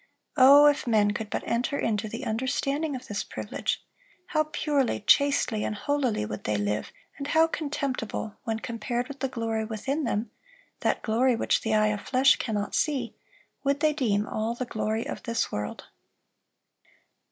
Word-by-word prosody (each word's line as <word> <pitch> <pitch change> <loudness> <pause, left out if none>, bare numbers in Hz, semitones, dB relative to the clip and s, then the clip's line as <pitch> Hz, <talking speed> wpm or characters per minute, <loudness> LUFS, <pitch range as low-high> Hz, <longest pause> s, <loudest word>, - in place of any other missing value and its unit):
Oh, 280 +3 +8
if 290 -3 +3
men 210 -3 +3
could 215 0 -4
but - - -3
enter 245 +5 0
into 215 -1 -1
the - - -6
understanding 275 +6 -1
of 255 - -7
this 205 -1 -2
privilege, - - -3 0.5
how 310 -2 +2
purely, 290 -6 0
chastely, 250 -2 +3
and 215 - -2
holily 260 - 0
would 105 0 -6
they 105 0 +1
live, 105 +1 -2 0.3
and 280 - -4
how 320 +2 +5
contemptible, 280 -9 -3
when 225 -1 -1
compared 240 +2 -3
with 280 0 -9
the 270 - -1
glory 225 -3 -2
within 250 +8 -2
them,—that 255 - -4
glory 240 +3 +2
which - - +1
the 220 -1 0
eye 215 0 +4
of 210 -1 -2
flesh 260 +1 +4
cannot 210 -3 -2
see,—would 280 +1 -2
they 305 0 +3
deem 215 -8 +1
all 220 +2 -2
the 255 - -3
glory 220 -1 -2
of - - -5
this 230 -2 -1
world." 105 0 -4
235 Hz, 160 wpm, -27 LUFS, 215-280 Hz, 0.5 s, Oh